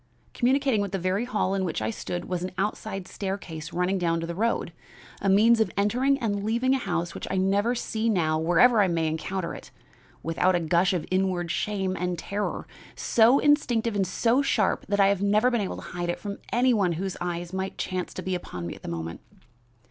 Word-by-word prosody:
Communicating 265 -3 +2
with 200 -1 -3
the - - +1
very 185 +5 0
hall 210 -5 0
in 195 -1 0
which 175 - -2
I 110 +1 -1
stood 90 -4 -5
was 180 -1 -3
an 185 - -2
outside 195 -1 -3
staircase 185 -6 -5
running 180 +2 0
down 165 -1 +1
to 165 - -3
the 170 - -4
road 200 -3 -1 0.5
a 195 - +1
means 225 +4 +5
of 220 - +2
entering 250 +7 +2
and 205 -6 -2
leaving 235 +5 +1
a 270 - +1
house 175 -6 -2
which - - -6
I 190 - -1
never 200 +5 +2
see 230 -1 -1
now 160 -6 +1
wherever 190 +8 +5
I 195 - +4
may 165 -2 0
encounter 165 +3 -3
it, - - -10 0.5
without 170 +3 +2
a - - +2
gush 170 +3 +2
of 175 - -2
inward 185 -2 0
shame 190 -2 -1
and 180 -1 -2
terror, 205 +5 -3 0.3
so 235 +4 +4
instinctive 245 -7 +2
and 195 -2 +1
so 230 +7 +2
sharp 220 -7 +1
that 200 0 0
I 195 0 +6
have 200 -1 0
never 210 +5 +3
been 240 -3 +1
able 195 - -3
to - - -9
hide 175 -1 -3
it 175 - -2
from 200 -1 -6
any 245 +1 +3
one 195 -6 +2
whose 190 +3 -3
eye 175 0 -2
might 190 0 -3
chance 185 -1 -3
to - - -5
be 190 - -2
upon 90 - -5
me 85 - -4
at - - -13
the - - -7
moment. 85 0 -5
195 Hz, 215 wpm, -26 LUFS, 175-220 Hz, 0.5 s, I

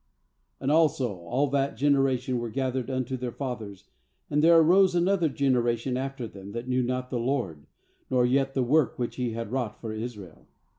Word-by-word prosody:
10And 135 +1 0
also 145 -8 +2
all 90 +12 0
that 140 -3 0
generation 135 -2 +2
were 120 -1 -4
gathered 130 +1 -2
unto 130 -1 -2
their 125 -1 -4
fathers; 115 -7 -6 0.5
and 150 +1 +2
there 165 +1 +7
arose 180 +3 +5
another 175 -1 +2
generation 125 -3 0
after 135 -1 -3
them, 100 -2 -10
that 120 +2 -5
knew 130 0 +1
not 125 +1 -2
the 125 - -1
LORD, 115 - -2 0.4
nor 125 -2 +3
yet 135 +2 +1
the 130 - +2
work 135 0 +2
which 120 -1 -3
He 125 -3 -2
had 115 -1 -5
wrought 125 -5 -3
for 110 -2 -5
Israel. 110 -7 -8
130 Hz, 180 wpm, -27 LUFS, 120-135 Hz, 0.5 s, there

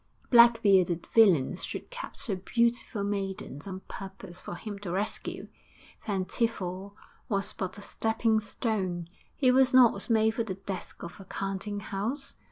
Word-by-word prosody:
Black 235 -1 +7
bearded 185 -4 +4
villains 185 - +4
should - - -5
capture 485 - -4
beautiful 235 +2 0
maidens 195 -6 -4
on 190 -1 -6
purpose 190 -3 -9
for - - -6
him 205 +2 -7
to 200 -3 -6
rescue. 200 +4 -3 0.6
Van 195 -3 0
Tiefel 200 -3 -2 0.3
was 200 -3 0
but 185 0 -4
a - - -9
stepping 220 +1 +1
stone; 190 -6 -2 0.3
he 260 -3 +4
was 260 0 +4
not 240 -5 +5
made 220 -1 +4
for 230 +1 -1
the 195 -4 -4
desk 195 -1 -6
of 170 +2 -8
a 195 - -10
counting 195 +2 -4
house. 225 +8 -3
200 Hz, 150 wpm, -29 LUFS, 190-225 Hz, 0.6 s, Black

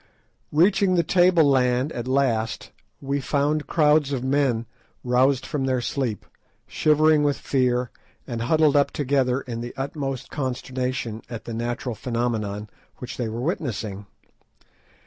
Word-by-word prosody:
Reaching 185 +4 +3
the 170 - +3
table 175 0 +4
land 130 +1 +2
at 120 -3 -5
last, 125 -4 0 0.3
we 140 0 -2
found 145 +2 0
crowds 150 -2 +3
of 130 -3 -2
men 130 -4 +1 0.4
roused 125 +2 +2
from 135 -3 -2
their 130 -1 +1
sleep, 120 -3 -2 0.4
shivering 155 0 +3
with 145 -1 +1
fear 125 -2 0 0.3
and 120 -3 -4
huddled 155 +4 +3
up 140 -1 +4
together 135 -2 0
in 115 -2 -6
the 120 +1 -7
utmost 135 -1 -4
consternation 125 -4 -3
at 115 -2 -7
the 115 - -5
natural 120 +2 -3
phenomenon 110 -3 -2 0.3
which 125 - -7
they 120 -3 -2
were 115 +2 -4
witnessing. 110 - -3
130 Hz, 135 wpm, -24 LUFS, 120-145 Hz, 0.4 s, table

